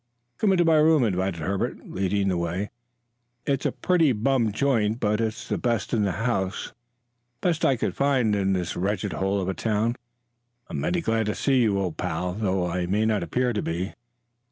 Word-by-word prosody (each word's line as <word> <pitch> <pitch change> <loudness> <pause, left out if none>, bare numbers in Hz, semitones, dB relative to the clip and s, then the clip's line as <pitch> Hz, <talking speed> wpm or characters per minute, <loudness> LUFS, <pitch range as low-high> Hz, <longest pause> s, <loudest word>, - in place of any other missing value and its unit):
"Come 210 - +3
into 175 -2 +3
my 160 -1 +5
room," 155 -2 +5
invited 95 -5 -1
Herbert, 95 +4 -2
leading 100 +1 0
the 90 - +1
way. 85 +4 -2 0.7
"It's 140 -1 +1
a - - -1
pretty 165 -7 +2
bum 120 0 +1
joint, 115 -2 +1
but 105 0 +1
it's 110 -1 -3
the - - -1
best 120 -1 -1
in 115 - +2
the 100 -3 +1
house 95 -6 -1 0.7
the 180 - +2
best 165 -1 -1
I 135 - +4
could 120 - -2
find 130 -6 +2
in 95 -1 +1
this 90 -2 -2
wretched 100 0 -1
hole 95 +5 0
of 95 - -2
a 95 - 0
town. 110 +3 0 0.8
I'm - - -3
mighty 175 0 0
glad 115 -6 0
to 105 - -1
see 135 -2 +2
you, 105 -4 +2
old 95 -4 -2
pal, 90 0 -2
though 95 -3 0
I 90 0 -2
may 105 +4 +1
not 110 -3 +1
appear 125 +8 0
to 105 - -1
be. 90 +4 -3
105 Hz, 200 wpm, -25 LUFS, 95-125 Hz, 0.8 s, my